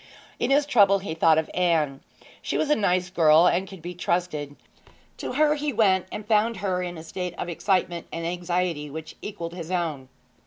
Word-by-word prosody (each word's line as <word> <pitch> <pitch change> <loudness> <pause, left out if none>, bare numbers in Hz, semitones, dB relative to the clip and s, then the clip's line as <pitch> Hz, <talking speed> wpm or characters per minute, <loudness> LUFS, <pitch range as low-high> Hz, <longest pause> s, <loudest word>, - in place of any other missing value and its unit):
In - - 0
his 285 +1 +4
trouble 200 -7 +5
he 190 -4 -5
thought 160 -1 +4
of 160 - +1
Anne. 160 -6 +1 0.4
She - - -2
was 300 - 0
a - - +6
nice 180 -3 0
girl 160 -1 +5
and 180 +2 +2
could 190 -4 -12
be 175 +1 -5
trusted. 170 -5 -2 0.6
To - - -5
her 300 +2 +3
he 300 0 -2
went, 190 -6 +2
and 210 - -6
found 220 +1 +2
her 185 -2 -1
in 175 -1 -5
a 160 - -8
state 180 +1 -5
of 175 - -4
excitement 175 -1 -1
and 165 0 -4
anxiety 175 -3 -2
which 160 +2 -8
equalled 170 -5 -6
his 170 -2 -7
own. 160 -8 -2
180 Hz, 195 wpm, -25 LUFS, 165-200 Hz, 0.6 s, a